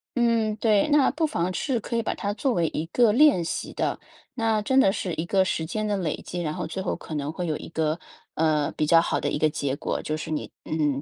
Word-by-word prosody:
嗯， 230 -3 +2
对， 215 0 +3
那 290 -2 +5
不 315 +3 0
妨 180 - -1
是 260 -5 0
可 235 - -5
以 230 - +1
把 - - -1
它 205 - -3
作 260 +3 0
为 170 -4 +1
一 155 - -3
个 230 +3 +4
练 255 - +5
习 165 - -4
的， - - -1 0.4
那 225 -3 +1
真 265 +5 +3
的 195 - +5
是 190 -4 -3
一 160 - -2
个 190 +2 +3
时 160 -3 -1
间 215 +5 -2
的 205 - 0
累 170 -6 -2
积， 175 - -5
然 155 -1 -2
后 - - -4
最 190 - -4
后 - - -1
可 155 - -8
能 145 +1 -2
会 180 0 -3
有 155 - -1
一 - - -9
个， 160 0 -1 0.4
呃， 155 -2 +1
比 150 - +2
较 165 +2 +6
好 - - -1
的 - - -1
一 - - -1
个 155 - +3
结 140 -2 -2
果， 145 - -3
就 155 - -2
是 155 - -6
你， 155 - -3
嗯， 150 -3 0
180 Hz, 280 characters per minute, -25 LUFS, 155-225 Hz, 0.4 s, 较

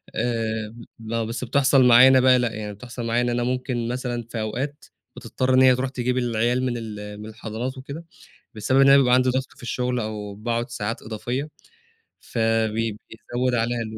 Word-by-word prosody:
آآ، 110 -2 -2 0.2
لأ، 115 +1 -3
بس 115 +2 -4
بتحصل 135 +1 +3
معايا 125 +2 +8
أنا 130 0 +6
بقى، 130 0 +5
لأ، 120 -2 0
يعني 105 -1 -5
بتحصل 120 +3 -8
معايا 115 +1 +1
إن 120 - 0
أنا 120 0 0
ممكن 125 -1 -2
مثلًا 120 -1 -3
في 115 - -4
أوقات، 130 +7 -4 0.3
بتضطر 130 +1 -1
إن 130 - +5
هي 130 -1 +6
تروح 130 +1 -2
تجيب 125 -1 -2
العيال 120 +1 0
من 125 - -1
ال 105 -2 -7
من - - -8
الحضانات 110 +4 -5
وكده، 140 +5 -8 0.5
بسبب 130 +5 +2
إن 135 - +6
أنا 140 - +8
بيبقى 125 -2 +4
عندي 130 0 +3
ضغط 130 +1 -1
في - - -17
الشُغل 125 0 -2
أو 105 -2 -5
باقعد 120 +3 -3
ساعات 115 -1 -4
إضافية، 120 +6 -4 0.7
فبي 115 -1 0
بي 105 - -11
بيزود 125 +3 -3
عليها 120 +1 0
ال 110 -1 -6
120 Hz, 195 wpm, -23 LUFS, 110-130 Hz, 0.7 s, معايا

